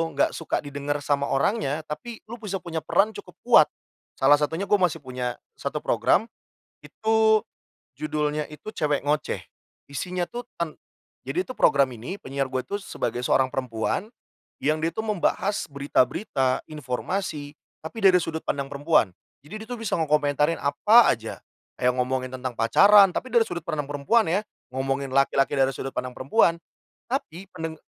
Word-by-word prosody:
enggak - - +2
suka 165 - -2
didengar 145 0 -3
sama 140 -1 +1
orangnya, 150 -1 0
tapi 225 +10 -6
lu 235 +2 -8
bisa 195 -2 -3
punya 165 -3 -5
peran 215 +3 +2
cukup - - -11
kuat, - - +7 0.5
salah 145 - +6
satunya 160 +6 -1
gue 205 - -1
masih 175 -3 +2
punya 125 -1 -4 0.2
satu - - -3
program, 220 - +2 0.5
itu 220 0 +2 0.6
judulnya 150 0 -1
itu 150 +8 -8
cewek 145 -2 0
ngoceh. 150 +1 0 0.5
Isinya 180 +4 -2
tuh 240 +5 -6 0.2
ten 165 -3 -2 0.5
jadi 365 +2 -2
itu - - -6
program 140 -2 +4
ini 130 - -7
penyiar 135 0 -3
gue 130 -1 -1
itu 205 0 -3
sebagai 120 -7 -3
seorang 130 +1 +3
perempuan, 130 - -2 0.5
yang 155 +1 0
dia 165 - +1
tuh 220 +5 -4
membahas 205 0 0
berita-berita 140 0 0
informasi 150 +2 -4 0.3
tapi 225 +8 -6
dari 185 -2 +7
sudut 160 -2 -4
pandang 140 -1 -2
perempuan. 145 - +2 0.3
Jadi, 185 - -11
dia - - -10
itu 245 - -3
bisa 225 -3 -2
ngekomentarin 150 0 +2
apa 205 +12 +5
aja. 115 -1 -6 0.4
Yang 125 0 +3
ngomongin 130 0 -1
tentang 130 0 -4
pacaran, 195 - +7
tapi 255 -1 -4
dari 235 - +5
sudut 175 -3 -5
pandang 150 -4 -3
perempuan 155 +10 +2
ya, 185 +5 +2 0.3
ngomongin 135 +1 -1
laki-laki 135 +1 +3
dari 135 0 +3
sudut 135 - -5
pandang 125 0 -3
perempuan, 165 - +2 0.5
tapi 195 - -4
pendeng 160 -2 -5
150 Hz, 155 wpm, -25 LUFS, 135-195 Hz, 0.6 s, kuat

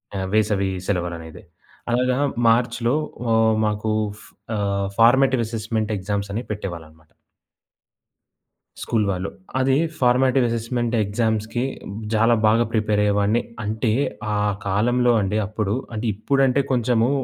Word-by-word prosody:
ఆహ్, 95 - -2
వేసవీ 105 -2 +2 0.2
సెలవులనేవి. 85 -3 -4 0.5
అలాగా 125 +1 +1 0.3
మార్చ్‌లో 120 +2 +2 0.4
అహ్, 110 0 +4
మాకూ 105 +1 -1 0.3
ఫ్ - - -15 0.3
ఆహ్, 100 -1 -1
ఫార్మేటివ్ 130 +2 +5
అసెస్మెంట్ 110 -1 -2
ఎగ్జామ్సని 100 +3 -3
పెట్టేవాళ్ళనమాట. 80 -6 -7 1.7
స్కూల్ 110 -2 0
వాళ్ళు. 95 0 -2 0.3
అదీ 130 0 +3 0.2
ఫార్మేటివ్ 130 +1 +3
అసెస్మెంట్ 115 +1 -1
ఎగ్జామ్స్‌కి 110 +2 -1 0.5
జాలా 115 +2 +4
బాగా 110 +2 +4
ప్రిపేరయ్యేవాడిని. 105 0 +2 0.2
అంటే, 110 +2 -1 0.4
ఆ - - 0 0.3
కాలంలో 120 +5 +2
అండి 100 +2 -1
అప్పుడు 105 -1 -2 0.2
అంటే 110 - -3
ఇప్పుడంటే, 135 +5 +2
కొంచము 120 -1 +2
110 Hz, 105 wpm, -22 LUFS, 100-120 Hz, 1.7 s, ఫార్మేటివ్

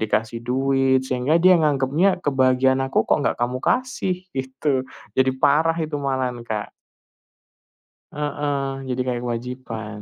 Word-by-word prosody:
dikasih 110 +2 -1
duit, 135 +1 +2
sehingga 130 +4 +1
dia 185 0 +7
nganggapnya 150 +6 +2
kebahagiaan 130 -1 +3
aku 135 - +1
kok - - +2
nggak - - 0
kamu 125 +1 0
kasih 190 -8 -1
gitu. 130 0 -1 0.3
Jadi 130 0 +4
parah 150 +4 +3
itu 155 -2 -2
malahan 130 -3 -2
Kak. 105 -2 -4 1.4
Heeh. 145 -1 -2 0.2
Jadi 125 0 -1
kayak 125 -1 -2
kewajiban. 115 -3 -5
130 Hz, 125 wpm, -22 LUFS, 125-145 Hz, 1.4 s, dia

